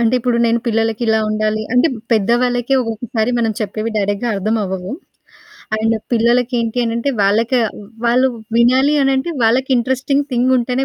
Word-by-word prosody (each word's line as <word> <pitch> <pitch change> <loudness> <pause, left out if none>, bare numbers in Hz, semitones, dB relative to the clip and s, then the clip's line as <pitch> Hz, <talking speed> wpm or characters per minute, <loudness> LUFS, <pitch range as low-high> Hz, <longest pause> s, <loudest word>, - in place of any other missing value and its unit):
అంటే, 235 +1 +2
ఇప్పుడు 245 0 0
నేను 230 +1 +2
పిల్లలకిలా 225 0 +1
ఉండాలి 215 0 -1
అంటే, 250 +6 +4 0.2
పెద్దవాళ్ళకే 245 +4 +1
ఒక్కొక్కసారి 225 0 -2
మనం 225 -2 0
చెప్పేవి 215 +2 -3
డైరెక్ట్‌‌‌‌‌‌‌‌గా 205 +3 -1
అర్థమవ్వవు. 195 -2 -2 0.9
అండ్ 225 +1 +1 0.2
పిల్లలకేంటి 235 0 +1
అనంటే, 230 +4 -1
వాళ్ళక 220 +5 +1 0.5
వాళ్ళు 255 +3 +3 0.3
వినాలి 260 +5 +4
అనంటే, 270 +5 0
వాళ్ళకి 255 +4 +2
ఇంట్రెస్టింగ్ 265 +3 0
థింగ్ 250 +1 +2
ఉంటేనే 250 +2 -1
235 Hz, 125 wpm, -17 LUFS, 220-250 Hz, 0.9 s, అంటే